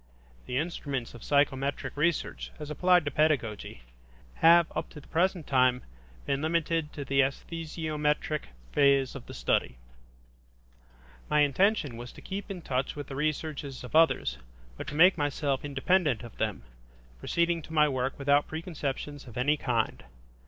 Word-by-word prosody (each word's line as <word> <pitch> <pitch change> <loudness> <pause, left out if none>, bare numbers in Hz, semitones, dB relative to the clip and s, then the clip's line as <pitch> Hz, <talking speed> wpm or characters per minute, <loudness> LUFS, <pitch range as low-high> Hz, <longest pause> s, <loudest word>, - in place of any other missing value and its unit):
The 125 - -2
instruments 140 -5 -3
of 120 - -11
psychometric 140 -1 0
research, 165 +3 -1
as 150 -1 -7
applied 180 +2 +4
to 145 - -1
pedagogy, 130 - 0 0.5
have 170 +1 +7
up - - -3
to 150 - -11
the - - -17
present 175 -1 +1
time 125 -2 +3 0.4
been 140 0 0
limited 165 -1 0
to 140 - -6
the 135 +1 +1
esthesiometric 150 +1 -1 0.3
phase 140 -2 +3
of 135 - -9
the - - -9
study. - - 0 1.5
My 150 - +4
intention 145 - +2
was 120 +1 -8
to - - -13
keep 200 +1 -5
in 185 -4 -6
touch 130 +1 -1
with 145 -2 -7
the 135 - -6
researches 150 -2 -3
of 125 - -7
others, 165 0 +3 0.4
but - - -7
to 145 - -5
make 175 +2 +6
myself 145 -1 -1
independent 145 -1 +1
of 120 - -10
them, 105 - -2 0.6
proceeding 170 - 0
to 160 - -13
my 150 -1 +4
work 130 -1 -2
without 145 +1 +3
preconceptions 145 -4 -5
of 120 - -10
any 145 +5 +3
kind. 120 -6 -1
145 Hz, 150 wpm, -29 LUFS, 135-160 Hz, 1.5 s, have